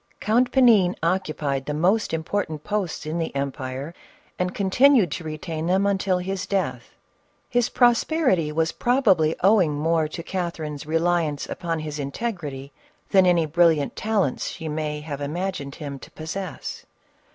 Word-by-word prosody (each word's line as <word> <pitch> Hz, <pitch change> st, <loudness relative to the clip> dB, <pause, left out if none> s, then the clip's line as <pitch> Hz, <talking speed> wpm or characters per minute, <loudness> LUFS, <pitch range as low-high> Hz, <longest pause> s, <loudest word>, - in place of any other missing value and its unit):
Count 240 Hz, +4 st, +2 dB
Panin 225 Hz, -9 st, +5 dB
occupied 155 Hz, -6 st, -1 dB
the 150 Hz, -, -2 dB
most 190 Hz, +8 st, +2 dB
important 160 Hz, -1 st, -2 dB
posts 205 Hz, -7 st, -2 dB
in 160 Hz, +2 st, -2 dB
the 165 Hz, -3 st, -3 dB
empire, 140 Hz, +2 st, -4 dB, 0.5 s
and 180 Hz, 0 st, -1 dB
continued 210 Hz, -, +4 dB
to 175 Hz, -, -4 dB
retain 155 Hz, +1 st, -4 dB
them 190 Hz, +2 st, +2 dB
until 195 Hz, -2 st, +1 dB
his 185 Hz, +1 st, -3 dB
death; 195 Hz, -2 st, -2 dB, 0.5 s
his 245 Hz, -1 st, +1 dB
prosperity 240 Hz, -, +2 dB
was 160 Hz, +1 st, 0 dB
probably 195 Hz, -, +2 dB
owing 190 Hz, -7 st, +4 dB
more 160 Hz, +1 st, +1 dB
to 165 Hz, +2 st, -7 dB
Catherine's 160 Hz, -5 st, -4 dB
reliance 165 Hz, -2 st, 0 dB
upon 170 Hz, -2 st, -3 dB
his 150 Hz, -1 st, -5 dB
integrity 140 Hz, -, -4 dB, 0.4 s
than 190 Hz, -2 st, +5 dB
any 170 Hz, -2 st, +4 dB
bril 165 Hz, +1 st, +4 dB
liant 145 Hz, -, -2 dB
talents 210 Hz, -10 st, 0 dB
she 160 Hz, -, -6 dB
could 150 Hz, -1 st, -3 dB
have 145 Hz, -2 st, -6 dB
imagined 150 Hz, -2 st, -3 dB
him 140 Hz, -3 st, -7 dB
to -, -, -12 dB
possess. 165 Hz, +3 st, -6 dB
170 Hz, 145 wpm, -24 LUFS, 150-195 Hz, 0.5 s, Panin